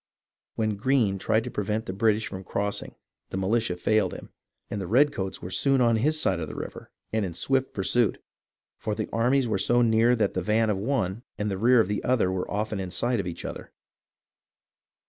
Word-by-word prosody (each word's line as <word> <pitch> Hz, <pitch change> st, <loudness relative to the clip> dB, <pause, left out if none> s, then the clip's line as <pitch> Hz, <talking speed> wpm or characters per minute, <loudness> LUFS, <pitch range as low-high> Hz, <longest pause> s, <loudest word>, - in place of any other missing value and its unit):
When 110 Hz, -2 st, -1 dB
Greene 110 Hz, -4 st, +2 dB
tried 110 Hz, +3 st, +1 dB
to -, -, -6 dB
prevent 105 Hz, +2 st, -2 dB
the 95 Hz, -, -4 dB
British 110 Hz, +1 st, +2 dB
from 95 Hz, 0 st, -6 dB
cross 100 Hz, +3 st, -2 dB
ing, -, -, -11 dB, 0.3 s
the -, -, -4 dB
militia 100 Hz, 0 st, 0 dB
failed 95 Hz, +1 st, +1 dB
him, -, -, -10 dB, 0.4 s
and 105 Hz, -, -4 dB
the 95 Hz, -, -4 dB
redcoats 115 Hz, -4 st, +1 dB
were 90 Hz, -, -6 dB
soon 135 Hz, +8 st, +2 dB
on 115 Hz, -2 st, +4 dB
his 155 Hz, +7 st, +1 dB
side 95 Hz, -, +1 dB
of 80 Hz, -, -4 dB
the -, -, -8 dB
river -, -, -7 dB, 0.2 s
and 110 Hz, -1 st, +1 dB
in 90 Hz, -4 st, -4 dB
swift 135 Hz, +6 st, 0 dB
pursuit, 105 Hz, +2 st, +1 dB, 0.6 s
for 105 Hz, -, -2 dB
the 110 Hz, -, -3 dB
armies 125 Hz, +3 st, +2 dB
were 105 Hz, -4 st, 0 dB
so 120 Hz, +4 st, +3 dB
near 115 Hz, +1 st, +4 dB
that 110 Hz, -, +1 dB
the 95 Hz, -, -1 dB
van 110 Hz, +3 st, +2 dB
of 100 Hz, -, -1 dB
one 105 Hz, -3 st, -1 dB, 0.2 s
and 105 Hz, 0 st, -1 dB
the 95 Hz, -, -2 dB
rear 120 Hz, +3 st, +5 dB
of 110 Hz, -, +3 dB
the 105 Hz, +1 st, -2 dB
other 120 Hz, -7 st, +2 dB
were 95 Hz, -1 st, -3 dB
often 105 Hz, 0 st, -2 dB
in 95 Hz, -1 st, -4 dB
sight 120 Hz, +6 st, 0 dB
of 95 Hz, -, -2 dB
each 85 Hz, -, -6 dB
other. -, -, -7 dB
110 Hz, 210 wpm, -26 LUFS, 95-120 Hz, 0.6 s, rear